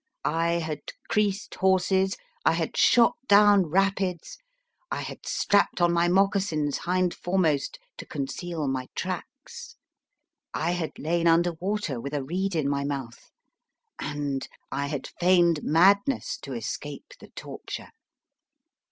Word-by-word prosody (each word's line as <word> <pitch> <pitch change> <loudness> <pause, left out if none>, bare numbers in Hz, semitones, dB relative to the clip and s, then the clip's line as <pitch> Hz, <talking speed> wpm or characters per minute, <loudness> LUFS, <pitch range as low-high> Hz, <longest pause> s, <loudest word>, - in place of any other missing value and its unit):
I 165 +2 +1
had 160 -3 -2 0.3
creased 210 -3 0
horses, 190 0 +2 0.3
1 - - +3
had - - -2
shot 235 -1 +5
down 205 -2 +6
rapids, 190 - 0 0.5
I - - -2
had - - -8
strapped 200 -2 +2
on 175 -1 +3
my 170 0 +3
mocassins 185 -6 +1
hind 180 0 0
foremost 175 - 0 0.2
to - - -8
conceal 150 +2 -4
my 130 -1 -2
tracks, 275 - -6 0.8
I 165 +2 0
had 175 -3 -3
lain 170 +2 0
under 170 +1 +4
water 175 - -3
with 140 +3 -5
a 140 - -1
reed 185 +6 -2
in 155 -3 +1
my 140 0 0
mouth, 135 -5 -5 0.7
and 145 -2 -3 0.2
I 140 +1 -2
had 140 -2 -4
feigned 175 -3 +4
madness 200 - +3
to - - -7
escape - - -6
the - - -14
torture. - - -7
175 Hz, 130 wpm, -26 LUFS, 150-195 Hz, 0.8 s, down